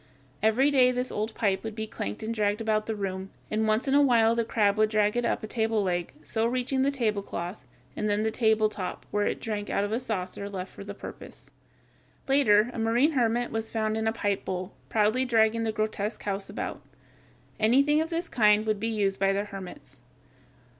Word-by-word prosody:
Every 235 Hz, +7 st, +3 dB
day 255 Hz, -2 st, +5 dB
this 250 Hz, 0 st, -2 dB
old 215 Hz, +2 st, -3 dB
pipe 195 Hz, -3 st, 0 dB
would 220 Hz, -1 st, -5 dB
be 220 Hz, -1 st, -3 dB
clanked 105 Hz, -, -5 dB
and 225 Hz, +1 st, -2 dB
dragged 210 Hz, -2 st, 0 dB
about 215 Hz, -1 st, 0 dB
the 220 Hz, -, -2 dB
room, 190 Hz, -1 st, -4 dB, 0.2 s
and 220 Hz, +1 st, +1 dB
once 215 Hz, +5 st, +1 dB
in 270 Hz, -, +2 dB
a 285 Hz, -, +6 dB
while 230 Hz, -5 st, +4 dB
the 230 Hz, 0 st, +1 dB
crab 210 Hz, -3 st, +2 dB
would 215 Hz, 0 st, +4 dB
drag 210 Hz, 0 st, +2 dB
it 240 Hz, 0 st, 0 dB
up -, -, -1 dB
a -, -, -4 dB
table 220 Hz, -1 st, 0 dB
leg, 175 Hz, -2 st, -1 dB
so 225 Hz, +8 st, 0 dB
reaching 255 Hz, +2 st, 0 dB
the 270 Hz, -, +3 dB
tablecloth 210 Hz, -7 st, -3 dB, 0.3 s
and 210 Hz, -, -1 dB
then 205 Hz, +1 st, +1 dB
the 220 Hz, -, 0 dB
table 220 Hz, -1 st, +3 dB
top, 195 Hz, -3 st, -5 dB
where 205 Hz, 0 st, +1 dB
it -, -, -2 dB
drank 210 Hz, -2 st, -4 dB
out 200 Hz, -, +1 dB
of 205 Hz, -, -2 dB
a 225 Hz, -, 0 dB
saucer 200 Hz, -4 st, -4 dB
left 190 Hz, -2 st, -6 dB
for -, -, -9 dB
the 200 Hz, 0 st, -7 dB
purpose. -, -, -11 dB, 0.8 s
Later 245 Hz, -5 st, +4 dB
a -, -, -5 dB
marine 235 Hz, +7 st, +3 dB
hermit 240 Hz, -3 st, +1 dB
was 225 Hz, 0 st, -3 dB
found 215 Hz, -1 st, -1 dB
in 220 Hz, 0 st, -1 dB
a -, -, +3 dB
pipe 205 Hz, -3 st, -1 dB
bowl, 185 Hz, +1 st, -4 dB, 0.2 s
proudly 220 Hz, +4 st, +2 dB
dragging 230 Hz, -2 st, +3 dB
the 225 Hz, -1 st, 0 dB
grotesque 215 Hz, 0 st, -3 dB
house 195 Hz, -1 st, -3 dB
about. -, -, -5 dB, 0.8 s
Anything 280 Hz, +7 st, +4 dB
of 320 Hz, -, -2 dB
this 335 Hz, 0 st, -2 dB
kind 210 Hz, -5 st, +3 dB
would 215 Hz, -2 st, 0 dB
be 225 Hz, -, -2 dB
used 205 Hz, -3 st, 0 dB
by 195 Hz, 0 st, +3 dB
the 200 Hz, +1 st, 0 dB
hermits. 195 Hz, +6 st, -10 dB
220 Hz, 210 wpm, -27 LUFS, 205-235 Hz, 0.8 s, a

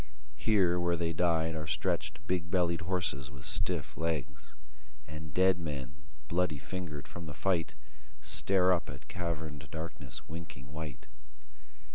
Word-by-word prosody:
Here 95 Hz, -5 st, +4 dB
where 85 Hz, 0 st, +2 dB
they 85 Hz, 0 st, +1 dB
died 80 Hz, -1 st, +3 dB
Are 80 Hz, -1 st, -3 dB
stretched 90 Hz, +3 st, 0 dB
big 90 Hz, -2 st, 0 dB
bellied 85 Hz, -2 st, +3 dB
horses 80 Hz, -6 st, 0 dB
with 70 Hz, -1 st, -10 dB
stiff -, -, 0 dB
legs; 80 Hz, -5 st, -2 dB, 0.5 s
And 75 Hz, 0 st, -7 dB
dead 95 Hz, +3 st, +5 dB
men, 70 Hz, -4 st, -3 dB, 0.3 s
bloody 85 Hz, -3 st, +2 dB
fingered 75 Hz, -2 st, -5 dB
from 85 Hz, -2 st, -7 dB
the 75 Hz, -, -6 dB
fight, 90 Hz, -2 st, +1 dB, 0.4 s
Stare 95 Hz, -1 st, +4 dB
up 85 Hz, -, 0 dB
at 65 Hz, -, -7 dB
caverned 80 Hz, -5 st, -3 dB
darkness 80 Hz, +1 st, -5 dB
winking 80 Hz, -4 st, -7 dB
white. 75 Hz, -3 st, -5 dB
80 Hz, 135 wpm, -33 LUFS, 75-90 Hz, 0.5 s, dead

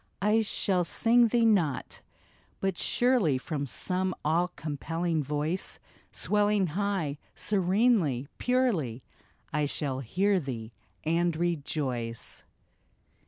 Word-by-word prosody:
I 215 Hz, +2 st, +4 dB
shall 195 Hz, -3 st, +1 dB
sing 235 Hz, +6 st, +4 dB
thee 235 Hz, +1 st, +2 dB
not; 180 Hz, -, +1 dB, 0.6 s
but 195 Hz, -1 st, 0 dB
surely 240 Hz, -, +2 dB
From 140 Hz, +1 st, -3 dB
some 185 Hz, +6 st, 0 dB
all 165 Hz, +4 st, +2 dB
compelling 160 Hz, +2 st, -2 dB
voice 150 Hz, +6 st, -2 dB, 0.3 s
Swelling 210 Hz, -1 st, +2 dB
high, 185 Hz, -7 st, -1 dB, 0.2 s
serenely, 190 Hz, -, +2 dB
purely, 200 Hz, -, +1 dB, 0.5 s
I 150 Hz, 0 st, +1 dB
shall 140 Hz, -2 st, -2 dB
hear 190 Hz, -, +1 dB
thee 120 Hz, -7 st, -6 dB, 0.3 s
and 170 Hz, +1 st, +1 dB
rejoice 140 Hz, -8 st, -2 dB
170 Hz, 100 wpm, -29 LUFS, 145-205 Hz, 0.6 s, I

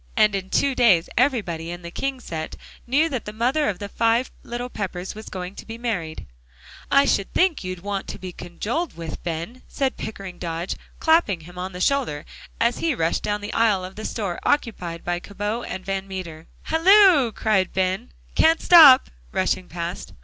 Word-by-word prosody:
And 215 Hz, -1 st, +5 dB
in 190 Hz, -1 st, -3 dB
two 280 Hz, +5 st, +2 dB
days 205 Hz, -10 st, +4 dB
everybody 205 Hz, -, 0 dB
in 175 Hz, 0 st, -7 dB
the 170 Hz, -, -7 dB
King 270 Hz, +6 st, -3 dB
set 160 Hz, -9 st, -6 dB, 0.3 s
knew 290 Hz, +6 st, +3 dB
that 255 Hz, -6 st, -4 dB
the 210 Hz, -, -5 dB
mother 250 Hz, +7 st, +1 dB
of 195 Hz, -, -3 dB
the 205 Hz, -, -6 dB
five 230 Hz, +4 st, +1 dB
little 240 Hz, +1 st, -5 dB
Peppers 190 Hz, -5 st, -5 dB
was 215 Hz, +1 st, -9 dB
going 185 Hz, 0 st, -6 dB
to -, -, -10 dB
be 225 Hz, 0 st, -7 dB
married. 190 Hz, -10 st, -3 dB, 0.6 s
"I 275 Hz, 0 st, +5 dB
should 200 Hz, -7 st, +1 dB
think 360 Hz, -, +2 dB
you'd 185 Hz, -1 st, -5 dB
want 200 Hz, 0 st, -3 dB
to -, -, -6 dB
be 185 Hz, -1 st, -7 dB
condoled 205 Hz, -, -4 dB
with, 165 Hz, -2 st, -6 dB
Ben," 170 Hz, +9 st, -5 dB
said 270 Hz, -2 st, -2 dB
Pickering 195 Hz, -4 st, -7 dB
Dodge, 170 Hz, +1 st, -3 dB, 0.2 s
clapping 320 Hz, -, +3 dB
him 175 Hz, +3 st, -11 dB
on 185 Hz, +1 st, -4 dB
the 180 Hz, -, -7 dB
shoulder 240 Hz, -, 0 dB, 0.3 s
as 235 Hz, +1 st, +1 dB
he 325 Hz, -4 st, 0 dB
rushed 165 Hz, -4 st, 0 dB
down 210 Hz, 0 st, -2 dB
the 205 Hz, +1 st, -6 dB
aisle 210 Hz, -5 st, +2 dB
of 185 Hz, -, -10 dB
the 215 Hz, -, -7 dB
store 195 Hz, -6 st, -3 dB
occupied 180 Hz, -12 st, -1 dB
by 175 Hz, 0 st, -1 dB
Cabot 205 Hz, +5 st, -4 dB
& -, -, -22 dB
Van 195 Hz, 0 st, -3 dB
Meter. 170 Hz, -4 st, -7 dB, 0.2 s
"Halloo!" 340 Hz, -, +5 dB
said 200 Hz, -4 st, +2 dB
Ben, 190 Hz, +5 st, -1 dB, 0.2 s
"can't 325 Hz, +1 st, +4 dB
stop," 300 Hz, -, +8 dB, 0.2 s
rushing 185 Hz, -, 0 dB
past. 170 Hz, +1 st, -5 dB
205 Hz, 185 wpm, -23 LUFS, 180-250 Hz, 0.6 s, stop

